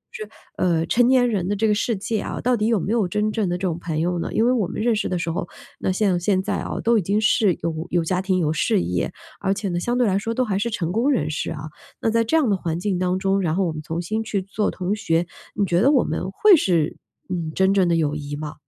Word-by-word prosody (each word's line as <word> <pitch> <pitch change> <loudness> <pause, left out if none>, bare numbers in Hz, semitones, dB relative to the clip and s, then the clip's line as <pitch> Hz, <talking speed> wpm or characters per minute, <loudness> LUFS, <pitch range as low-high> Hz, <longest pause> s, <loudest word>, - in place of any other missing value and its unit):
就 440 - -5
是， - - -20 0.3
呃， 165 -2 +1
成 240 0 +3
年 255 -1 +4
人 195 -6 -1
的 205 - 0
这 220 +2 +1
个 210 - +3
世 220 0 0
界 215 +2 -2
啊， - - -4
到 250 0 +2
底 215 -1 0
有 225 -3 +2
没 200 +5 -2
有 225 -5 +2
真 210 +4 0
正 210 -4 -1
的 175 - -1
这 185 +1 -2
种 170 -1 -3
朋 160 -2 -3
友 175 +1 0
呢？ - - -3
因 225 - +2
为 245 - +4
我 230 -7 +1
们 - - -6
认 230 +1 +2
识 215 - -1
的 180 - -1
时 170 -1 -2
候 170 +1 -4 0.3
那 - - 0
像 185 -2 +1
现 185 +2 +1
在 - - -1
啊， - - -4
都 230 -1 +4
已 - - -1
经 200 +4 0
是 210 -3 +3
有 165 +1 -3
有 175 -1 +1
家 180 +3 0
庭、 190 -1 0
有 155 -3 +1
事 160 - +1
业， 90 0 -1 0.3
而 195 - 0
且 205 -1 -3
呢， 175 -1 -1
相 240 +7 -1
对 250 - +3
来 195 -2 +2
说 225 +3 -3
都 255 - +1
还 195 -3 -1
是 235 - -1
成 175 -7 -2
功 230 +8 +1
人 250 - +1
士 155 - -3
啊。 150 -3 -6 0.4
那 225 - 0
在 230 0 +3
这 320 +9 +2
样 290 -6 +2
的 - - +3
环 165 -2 -3
境 185 -1 -1
当 185 0 0
中， 195 +1 +1
然 165 -3 0
后 195 0 +1
我 165 - -1
们 155 - -6
重新 175 +8 -3
去 200 -3 -2
做 205 +2 -1
同 190 +2 -2
学， 170 -4 0 0.3
你 205 - +1
觉 175 -1 +1
得 270 +6 +5
我 270 -4 +4
们 185 - -3
会 405 - +6
是， 175 - +1 0.3
嗯， 170 -3 -3
真 190 +1 +3
正 190 -3 +3
的 170 - +2
友 155 -3 +1
谊 145 -1 -5
吗？ 150 0 -6
190 Hz, 315 characters per minute, -22 LUFS, 170-220 Hz, 0.4 s, 会